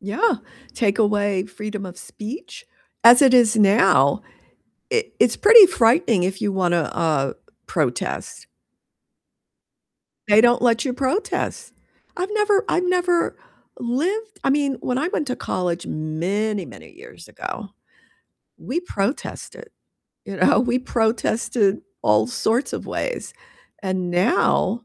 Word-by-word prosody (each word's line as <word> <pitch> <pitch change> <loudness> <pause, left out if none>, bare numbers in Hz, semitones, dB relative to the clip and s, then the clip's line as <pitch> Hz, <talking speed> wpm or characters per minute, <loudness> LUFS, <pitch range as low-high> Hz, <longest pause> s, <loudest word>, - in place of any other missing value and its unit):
Yeah, 205 - 0 0.4
take 210 -2 0
away 205 -3 +1
freedom 210 0 -7
of 180 0 -10
speech, 275 - -9 0.4
as 240 +3 +8
it 265 -2 +5
is 235 -3 +5
now, 210 +1 +4 0.7
it 455 0 -2
it's - - +3
pretty 440 0 +9
frightening 235 - +2
if 190 +1 -3
you 205 - 0
wanna, 175 -3 +1
uh, 150 -5 0 0.3
protest. - - -3 1.8
They 210 +1 +6
don't 240 0 +3
let 235 +1 +2
you 255 - -1
protest. 275 - -3 0.4
I've 365 +2 -3
never 420 0 +2
I've 360 +1 0
never 355 -1 0 0.4
lived 380 - -3
I - - +1
mean, 280 -1 +1
when 250 - -2
I 305 +5 -1
went 300 -5 -3
to 250 - -2
college 175 -1 -3
many, 185 +6 -3
many - - -14
years - - -15
ago, - - -7 0.9
we 305 +7 -3
protested, 250 - -5 0.6
you 195 -1 -7
know, 185 - +3
we 245 0 0
protested 225 -3 0 0.2
all 105 +1 +3
sorts 225 - -1
of - - -6
ways, - - -4 0.5
and 185 -2 -2
now 195 +4 +1
230 Hz, 125 wpm, -21 LUFS, 195-290 Hz, 1.8 s, pretty